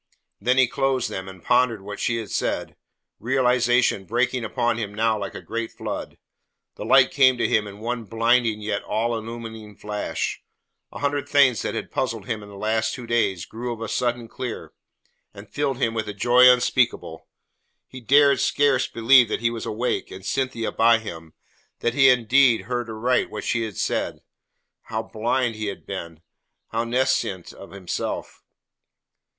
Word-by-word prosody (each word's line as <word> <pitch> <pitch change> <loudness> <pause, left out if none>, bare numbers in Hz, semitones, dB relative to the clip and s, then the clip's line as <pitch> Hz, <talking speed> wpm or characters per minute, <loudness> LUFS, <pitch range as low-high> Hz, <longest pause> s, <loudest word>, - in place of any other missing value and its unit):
Then 125 +1 +1
he 130 -1 +5
closed 135 0 -1
them 95 0 -5
and 95 -3 -13
pondered 120 -3 +2
what 105 +1 -7
she 115 - 0
had 110 -3 -6
said, - - -2 0.4
realization 125 -4 +2
breaking 125 +3 0
upon 120 0 -1
him 105 -2 -5
now 110 +1 +2
like 100 -1 -6
a - - -8
great 115 0 -4
flood. - - -6 0.6
The - - -8
light 135 -1 +5
came 130 -3 +4
to - - +1
him 105 -1 +1
in 100 0 -10
one 115 +1 -4
blinding 115 +1 +1
yet 105 -1 -2
all 115 +2 -1
illuming 115 -2 -7
flash. 105 0 -3 0.5
A - - -9
hundred 145 0 -1
things 135 -6 +4
that - - -3
had - - -5
puzzled - - -2
him 110 -2 -3
in 105 - -12
the 100 - -12
last 110 +1 0
two 125 - -8
days 110 -7 0
grew 120 +2 -6
of 115 - -6
a 115 - -4
sudden 120 0 -1
clear, 125 0 -6 0.6
and 100 +1 -11
filled 140 -3 -1
him 115 -4 0
with 110 -2 -3
a 105 - -6
joy 125 +4 +6
unspeakable. 125 0 0 0.6
He 130 - -11
dared 140 +2 +5
scarce 140 -1 +2
believe 120 0 +5
that - - -2
he 115 0 +1
was 115 -1 -5
awake, 115 +3 -2
and 95 0 -10
Cynthia 130 -3 -2
by 115 0 +4
him 80 -7 -9 0.5
that 120 - 0
he 135 +1 +5
had 130 -1 +6
indeed 125 -1 +4
heard 120 +3 -4
aright 115 +3 0
what 105 - -6
she 115 - 0
had 105 -5 -8
said. - - -2 0.6
How 110 0 -3
blind 120 +2 -1
he 110 -1 -3
had 100 - -6
been, 85 -4 -7 0.5
how 115 +1 -1
nescient 120 -7 -1
of 100 - -12
himself! 95 -3 -5
115 Hz, 175 wpm, -23 LUFS, 110-125 Hz, 0.6 s, joy